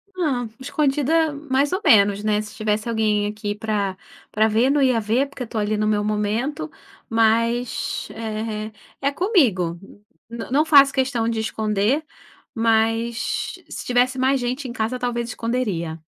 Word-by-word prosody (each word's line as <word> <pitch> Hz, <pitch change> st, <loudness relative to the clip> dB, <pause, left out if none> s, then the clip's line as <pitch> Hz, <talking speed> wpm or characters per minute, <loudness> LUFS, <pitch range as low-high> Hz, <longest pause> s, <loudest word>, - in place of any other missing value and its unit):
Não, 265 Hz, -10 st, -1 dB
escondida 300 Hz, +3 st, +1 dB
mais 285 Hz, -1 st, 0 dB
ou 380 Hz, +3 st, -1 dB
menos, 205 Hz, -1 st, +5 dB
né. 210 Hz, -1 st, +1 dB
Se 215 Hz, -, -10 dB
tivesse 215 Hz, +1 st, -1 dB
alguém 215 Hz, -2 st, +1 dB
aqui 205 Hz, 0 st, -4 dB
pra 205 Hz, -3 st, -2 dB, 0.3 s
pra 215 Hz, +1 st, +3 dB
ver, 225 Hz, +5 st, +2 dB
não 285 Hz, 0 st, +2 dB
ia 255 Hz, -4 st, +3 dB
ver, 230 Hz, +6 st, +1 dB
porque 270 Hz, -2 st, -7 dB
eu -, -, -5 dB
estou 220 Hz, -1 st, -4 dB
ali 210 Hz, +1 st, 0 dB
no 215 Hz, 0 st, 0 dB
meu 210 Hz, -1 st, +1 dB
momento, 210 Hz, -, -1 dB, 0.4 s
mas, 230 Hz, +2 st, +1 dB
eh, 220 Hz, -1 st, -4 dB, 0.3 s
é 280 Hz, +1 st, +1 dB
comigo. 245 Hz, -, +1 dB, 0.5 s
Não 235 Hz, +1 st, -7 dB
não 295 Hz, +4 st, +3 dB
faço 280 Hz, -3 st, +6 dB
questão 260 Hz, -4 st, 0 dB
de 225 Hz, -1 st, -1 dB
esconder. 220 Hz, +6 st, 0 dB, 0.5 s
Mas, 225 Hz, +1 st, 0 dB, 0.2 s
se -, -, -7 dB
tivesse 250 Hz, +1 st, +2 dB
mais 265 Hz, +1 st, +2 dB
gente 255 Hz, +3 st, -3 dB
em 240 Hz, -, -6 dB
casa, 250 Hz, +2 st, -2 dB
talvez 240 Hz, -1 st, -2 dB
esconderia. 205 Hz, -10 st, -2 dB
230 Hz, 155 wpm, -22 LUFS, 215-260 Hz, 0.5 s, faço